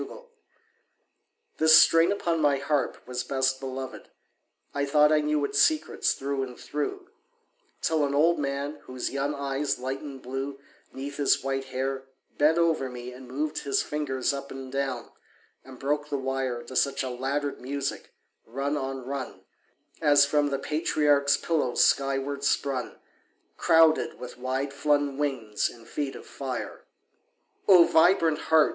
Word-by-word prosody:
HARMONICS -, -, -9 dB, 1.3 s
This 160 Hz, 0 st, +8 dB
string 165 Hz, +2 st, +6 dB
upon 170 Hz, -5 st, 0 dB
my 145 Hz, -2 st, +3 dB
harp 140 Hz, -1 st, -1 dB
was 125 Hz, 0 st, -3 dB
best 130 Hz, -1 st, 0 dB
beloved: 130 Hz, -1 st, -6 dB, 0.6 s
I 140 Hz, -, -1 dB
thought 150 Hz, +2 st, +4 dB
I 155 Hz, -1 st, +4 dB
knew 150 Hz, -1 st, +1 dB
its 140 Hz, 0 st, +1 dB
secrets 310 Hz, -1 st, +2 dB
through 140 Hz, 0 st, -3 dB
and 125 Hz, -2 st, -5 dB
through; 365 Hz, -, -4 dB, 0.7 s
Till 160 Hz, -2 st, +2 dB
an 140 Hz, 0 st, 0 dB
old 165 Hz, +3 st, +3 dB
man, 140 Hz, +1 st, -3 dB
whose 130 Hz, -1 st, -4 dB
young 140 Hz, +2 st, -1 dB
eyes 140 Hz, 0 st, -1 dB
lightened 135 Hz, +1 st, -6 dB
blue 135 Hz, +2 st, -4 dB, 0.3 s
'Neath 140 Hz, +1 st, -7 dB
his 145 Hz, -2 st, +2 dB
white 135 Hz, 0 st, -2 dB
hair, 135 Hz, +1 st, -3 dB, 0.3 s
bent 155 Hz, +3 st, +4 dB
over 160 Hz, -6 st, +2 dB
me 125 Hz, 0 st, -8 dB
and 130 Hz, 0 st, -12 dB
moved 150 Hz, +4 st, -2 dB
His 140 Hz, -1 st, 0 dB
fingers 140 Hz, -3 st, -1 dB
up 140 Hz, 0 st, -6 dB
and 135 Hz, -1 st, -8 dB
down, 135 Hz, -3 st, -3 dB, 0.5 s
and 130 Hz, -1 st, -12 dB
broke 145 Hz, +2 st, -2 dB
the 145 Hz, -, -1 dB
wire 130 Hz, -2 st, -2 dB
To 130 Hz, -, -10 dB
such 135 Hz, +1 st, +1 dB
a 130 Hz, -, -3 dB
laddered 140 Hz, +3 st, -2 dB
music, 140 Hz, +2 st, -4 dB, 0.4 s
rung 135 Hz, +5 st, -2 dB
on 135 Hz, -2 st, -4 dB
rung, 135 Hz, 0 st, -5 dB, 0.6 s
As 145 Hz, -2 st, +6 dB
from 145 Hz, 0 st, +2 dB
the 140 Hz, -1 st, -1 dB
patriarch's 145 Hz, -1 st, +2 dB
pillow 150 Hz, -7 st, -1 dB
skyward 140 Hz, +1 st, +1 dB
sprung 135 Hz, -3 st, -1 dB, 0.6 s
Crowded 160 Hz, -1 st, +4 dB
with 125 Hz, 0 st, -9 dB
wide 130 Hz, +2 st, -2 dB
flung 145 Hz, -1 st, +1 dB
wings 125 Hz, -8 st, -1 dB
and 115 Hz, -1 st, -15 dB
feet 140 Hz, -2 st, -3 dB
of -, -, -10 dB
fire. 130 Hz, -3 st, -6 dB, 0.8 s
O 180 Hz, -3 st, +9 dB
vibrant 165 Hz, -2 st, +4 dB
heart! 160 Hz, -2 st, +4 dB
140 Hz, 150 wpm, -27 LUFS, 135-150 Hz, 1.3 s, O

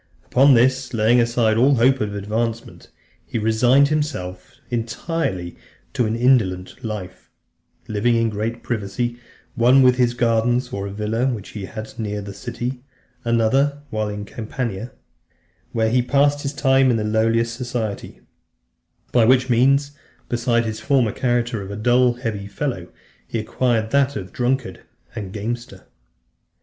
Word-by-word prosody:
Upon 135 Hz, +1 st, +5 dB
this, 130 Hz, +1 st, +2 dB
laying 115 Hz, +3 st, +4 dB
aside 115 Hz, -2 st, +2 dB
all 135 Hz, +4 st, +4 dB
hope 130 Hz, +3 st, +3 dB
of 105 Hz, -1 st, -2 dB
advancement, 110 Hz, +3 st, -4 dB, 0.3 s
he -, -, -5 dB
resigned 120 Hz, +6 st, +3 dB
himself 95 Hz, -13 st, -3 dB, 0.2 s
entirely 115 Hz, -, -3 dB, 0.4 s
to 125 Hz, -5 st, +1 dB
an 110 Hz, -, -1 dB
indolent 110 Hz, -7 st, +1 dB
life; 105 Hz, -5 st, -6 dB, 0.6 s
living 110 Hz, +3 st, +1 dB
in 115 Hz, -1 st, +1 dB
great 110 Hz, +3 st, -3 dB
privacy, 120 Hz, +2 st, -3 dB, 0.3 s
one 130 Hz, +2 st, +5 dB
while 125 Hz, -, +7 dB
in 125 Hz, -, -7 dB
his 120 Hz, -1 st, +2 dB
gardens, 120 Hz, +1 st, +1 dB
or 100 Hz, -5 st, -4 dB
a -, -, -6 dB
villa 110 Hz, +5 st, -1 dB
which 115 Hz, -6 st, -4 dB
he 105 Hz, -3 st, -6 dB
had 110 Hz, +2 st, -8 dB
near 105 Hz, -2 st, -3 dB
the 100 Hz, -1 st, -7 dB
city; 125 Hz, +3 st, -5 dB, 0.4 s
another 130 Hz, +5 st, +1 dB
while 110 Hz, -1 st, -1 dB
in 105 Hz, 0 st, -5 dB
Campania, 115 Hz, 0 st, -5 dB, 0.8 s
where 110 Hz, -1 st, +1 dB
he 125 Hz, +1 st, +3 dB
passed 145 Hz, +3 st, +2 dB
his 140 Hz, 0 st, -3 dB
time 135 Hz, -2 st, +3 dB
in 120 Hz, -, +2 dB
the 110 Hz, -, -1 dB
lowest 115 Hz, +2 st, +1 dB
society; 120 Hz, -4 st, -5 dB, 0.9 s
by 120 Hz, -, +4 dB
which 130 Hz, +2 st, +4 dB
means, 140 Hz, +4 st, +3 dB, 0.4 s
besides 120 Hz, -1 st, +1 dB
his 110 Hz, 0 st, -4 dB
former 125 Hz, -2 st, +2 dB
character 120 Hz, -2 st, -1 dB
of 95 Hz, -, -8 dB
a 100 Hz, -, -5 dB
dull, 120 Hz, +3 st, +3 dB
heavy 115 Hz, -5 st, -4 dB
fellow, 100 Hz, -4 st, -4 dB, 0.4 s
he -, -, -3 dB
acquired 110 Hz, 0 st, 0 dB
that 140 Hz, 0 st, +2 dB
of 95 Hz, -3 st, -5 dB
a -, -, -26 dB
drunkard 130 Hz, 0 st, -1 dB, 0.3 s
and 100 Hz, -5 st, -5 dB
gamester. 110 Hz, -1 st, -5 dB
115 Hz, 150 wpm, -21 LUFS, 110-125 Hz, 0.9 s, while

